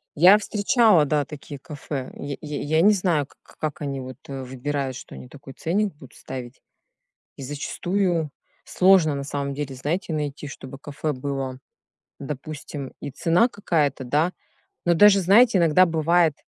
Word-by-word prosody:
Я 185 +7 +8
встречала, 210 - +3
да, 145 0 +1
такие 145 0 -9
кафе. 145 -3 -6
Й 140 -1 -6
й 150 -2 -5
я 160 +2 +2
не 205 - +6
знаю 175 -7 +1
к - - -24
к - - -21
как 155 -1 -4
они 140 -2 -3
вот 130 -1 -8
выбирают, 135 0 -4
что - - -11
они 125 - -10
такой 135 0 -12
ценник 195 +6 -1
будут 135 -3 -15
ставить. 125 -1 -8 0.7
И - - -11
зачастую 170 +4 -1 0.3
сложно, 180 -6 +4
на 140 - -4
самом 140 0 -3
деле, 145 -2 -4
знаете, 160 +6 -2
найти, 150 -1 -3
чтобы 135 -1 -9
кафе 145 +1 -4
было, 135 -1 -4 0.6
допустим, 145 0 -7
и 145 - -5
цена 170 - +2
какая-то, 150 - -1
да, 150 +8 +1 0.5
но 175 - +4
даже, 205 +2 +7
знаете, 210 +4 +5
иногда 170 +2 +5
бывает, 165 -1 +2
150 Hz, 155 wpm, -24 LUFS, 140-175 Hz, 0.7 s, Я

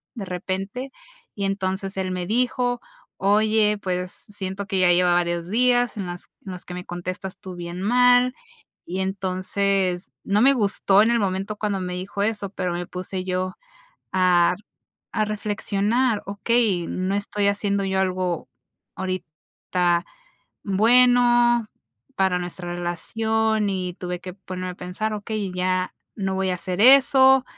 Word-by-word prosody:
de 205 - -5
repente, 195 +8 -4 0.4
y 200 - -4
entonces 195 0 -2
él 185 -1 -1
me 180 -1 -3
dijo: 245 +1 +1 0.4
"Oye, 210 +1 +3
pues, 180 -1 -2
siento 200 -1 -6
que 190 0 0
ya 180 -1 +5
lleva 180 0 +4
varios 175 0 0
días 245 0 +2
en 195 -3 -3
las 175 0 -7 0.2
en 190 - -5
los 180 - -8
que 180 - -8
me 180 0 -6
contestas 185 +2 -5
tú 185 -1 -8
bien 175 +1 -6
mal". 245 +2 +4 0.5
Y 185 +2 -3
entonces 190 0 -1
no 205 +2 +2
me 275 +3 +7
gustó 200 -3 +3
en 230 - +2
el 235 - +2
momento 195 +1 -2
cuando 205 -2 -1
me 180 0 -4
dijo 190 +2 -4
eso, 210 -2 -1
pero 185 -3 -2
me 175 0 -3
puse 185 0 -4
yo 185 0 -2 0.6
a 180 -2 +4
r 210 - -21 0.5
a 215 -2 +1
reflexionar: 210 +2 0
"Okey, 200 -3 +1
no 185 +2 -2
estoy 205 0 0
haciendo 200 0 0
yo 190 0 0
algo 185 -2 -1 0.5
ahorita 175 0 -2 0.6
bueno 240 +2 +4 0.5
para 190 -2 +2
nuestra 175 0 -5
relación". 220 +4 0
Y 185 -2 -3
tuve 180 -1 -5
que 185 -1 -8
ponerme 185 -1 -6
a - - -12
pensar: 215 +5 -3
"Okey 210 -2 -4
ya 185 0 0 0.2
no 190 -2 -2
voy 190 -1 0
a - - +1
hacer 180 +1 -3
eso". 265 0 +7
195 Hz, 150 wpm, -23 LUFS, 180-215 Hz, 0.6 s, me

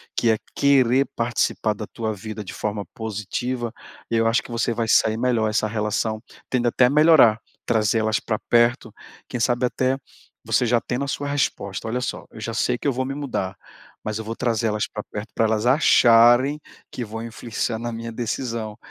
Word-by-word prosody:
que 115 - +2
é 110 - +3 0.2
querer 135 -1 +4
participar 115 -2 0
da 105 0 -7
tua 110 -2 -3
vida 105 +1 -7
de 95 - -8
forma 105 -1 -3
positiva, 110 +3 -4 0.4
eu 115 0 +2
acho 115 +1 +2
que - - -11
você 115 0 0
vai 115 0 -1
se - - +5
sair 110 0 +1
melhor, 115 -3 +1
essa 110 0 +1
relação 110 0 -1 0.3
tende 120 -2 0
até 125 +1 +4
a - - +4
melhorar, 150 -7 +6 0.3
trazê-las 110 -1 +1
pra 110 -2 -2
perto. 120 -1 +2 0.3
Quem 125 - -4
sabe 120 +2 +1
até, 130 +1 0 0.5
você - - +2
já 120 0 +3
tendo 125 +4 -3
a - - -7
sua 145 +1 -3
resposta, 115 -8 -2
olha 125 +3 -1
só, - - -4
"eu - - -11
já 115 +1 -4
sei 125 +2 0
que 145 - -4
eu 135 - +2
vou 130 - -1
me 135 +1 -4
mudar, 100 -10 -3 0.5
mas 110 0 -3
eu 110 - -5
vou 115 +1 -5
trazer 115 -1 0
elas 105 0 -1
pra 105 - -6
perto 105 +1 -6
pra 115 - +2
elas 110 +1 0
acharem 125 0 +5 0.3
que 125 - -4
vão 115 0 -6
influenciar 115 0 -3
na 120 0 -4
minha 115 0 -6
decisão. 115 -1 -3
O - - -20
115 Hz, 200 wpm, -23 LUFS, 110-125 Hz, 0.5 s, melhorar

